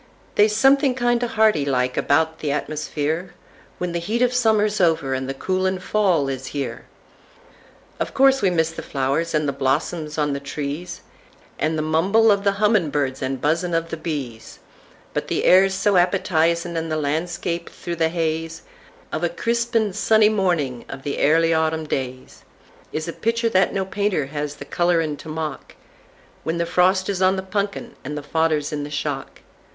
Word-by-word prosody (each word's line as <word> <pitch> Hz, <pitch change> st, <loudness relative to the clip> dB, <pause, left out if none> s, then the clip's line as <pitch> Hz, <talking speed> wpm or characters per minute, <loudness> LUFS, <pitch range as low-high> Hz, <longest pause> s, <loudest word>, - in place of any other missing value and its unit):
They's 210 Hz, +1 st, +4 dB
something 270 Hz, +2 st, +4 dB
kindo' 240 Hz, -1 st, +1 dB
harty 220 Hz, -9 st, +3 dB
like 125 Hz, -2 st, 0 dB
about 160 Hz, +2 st, +1 dB
the 155 Hz, -, -5 dB
atmusfereWhen 155 Hz, +3 st, -2 dB, 0.6 s
the 170 Hz, -, -1 dB
heat 220 Hz, +8 st, 0 dB
of 250 Hz, 0 st, +2 dB
summer's 215 Hz, -4 st, +2 dB
over 160 Hz, -6 st, +2 dB
and 130 Hz, 0 st, -3 dB
the -, -, -1 dB
coolin' 185 Hz, +5 st, 0 dB
fall 185 Hz, -6 st, +1 dB
is 135 Hz, -1 st, -4 dB, 1.5 s
here—Of -, -, -5 dB
course 270 Hz, 0 st, +5 dB
we 195 Hz, -, +3 dB
miss 165 Hz, -2 st, +1 dB
the 165 Hz, -, -7 dB
flowers, 140 Hz, +5 st, -1 dB
and 150 Hz, -1 st, +1 dB
the 140 Hz, -, 0 dB
blossoms 150 Hz, +3 st, -1 dB
on 145 Hz, -2 st, +1 dB
the 140 Hz, -, -2 dB
trees, 150 Hz, +6 st, -5 dB, 0.6 s
And 160 Hz, +1 st, 0 dB
the 155 Hz, -, -1 dB
mumble 195 Hz, +8 st, +3 dB
of 200 Hz, -1 st, +1 dB
the 200 Hz, -1 st, +3 dB
hummin' 205 Hz, -5 st, +2 dB
birds 135 Hz, -2 st, -1 dB
and 130 Hz, 0 st, -2 dB
buzzin' 165 Hz, +5 st, 0 dB
of 165 Hz, 0 st, -1 dB
the -, -, -1 dB
bees; 140 Hz, -9 st, -6 dB, 0.6 s
But -, -, -2 dB
the -, -, -1 dB
air's 190 Hz, +1 st, +5 dB
so 200 Hz, +1 st, +2 dB
appetizin'; 170 Hz, -2 st, +1 dB
and 165 Hz, 0 st, -3 dB
the 155 Hz, -, 0 dB
landscape 170 Hz, +3 st, -2 dB
through 170 Hz, -1 st, -6 dB
the 160 Hz, 0 st, +2 dB
hazeOf 165 Hz, -1 st, -2 dB, 0.5 s
a -, -, -1 dB
crisp 235 Hz, -, -2 dB
and 215 Hz, -4 st, +2 dB
sunny 220 Hz, -1 st, +4 dB
morning 175 Hz, -, 0 dB
of 135 Hz, -, -8 dB
the 145 Hz, -, -3 dB
airly 165 Hz, +2 st, +4 dB
autumn 160 Hz, 0 st, 0 dB
daysIs 130 Hz, +3 st, -7 dB
a 170 Hz, -, -4 dB
pictur' 230 Hz, +1 st, 0 dB
that 190 Hz, -3 st, +3 dB
no 195 Hz, -1 st, -1 dB
painter 200 Hz, -5 st, -1 dB
has 145 Hz, +1 st, -4 dB
the 140 Hz, -, -9 dB
colorin' 165 Hz, -1 st, +1 dB
to 160 Hz, -, -10 dB
mock—When 155 Hz, +1 st, -7 dB
the 170 Hz, -, 0 dB
frost 185 Hz, +2 st, +2 dB
is 195 Hz, -2 st, -2 dB
on 185 Hz, +1 st, +4 dB
the 190 Hz, -, -3 dB
punkin 200 Hz, +1 st, -3 dB
and 150 Hz, +3 st, -5 dB
the 145 Hz, -, -5 dB
fodder's 155 Hz, -1 st, 0 dB
in 145 Hz, -1 st, -2 dB
the 145 Hz, -, -6 dB
shock. 145 Hz, -, -4 dB
165 Hz, 170 wpm, -22 LUFS, 150-195 Hz, 1.5 s, course